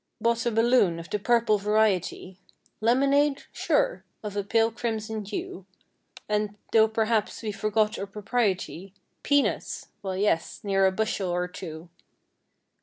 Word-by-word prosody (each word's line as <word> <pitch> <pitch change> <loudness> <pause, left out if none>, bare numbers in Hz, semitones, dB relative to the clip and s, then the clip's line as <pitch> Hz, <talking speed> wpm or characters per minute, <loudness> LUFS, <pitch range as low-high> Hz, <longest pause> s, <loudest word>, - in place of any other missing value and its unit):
Bought 235 0 +1
a - - +2
balloon 225 -6 +3
of 170 0 -9
the 210 - 0
purple 230 -1 +3
variety. 200 -3 0 0.4
Lemonade? 275 +5 +3
Sure - - 0 0.2
I - - -3
of 200 - -12
a 205 - -1
pale 225 +3 +2
crimson 220 -2 -3
hue. 195 -2 -6 0.6
And, 210 -1 -1
though 220 -1 +6
perhaps 220 0 0
we 215 - -2
forgot 215 +1 0
our 200 - -4
propriety— 200 -3 -2 0.3
Peanuts! 285 -1 0
Well 190 -2 -3
yes, 200 -4 0
near 195 -1 +3
a - - +2
bushel 200 -2 -1
or 180 0 0
two. 170 -2 -8
210 Hz, 140 wpm, -26 LUFS, 195-230 Hz, 0.6 s, though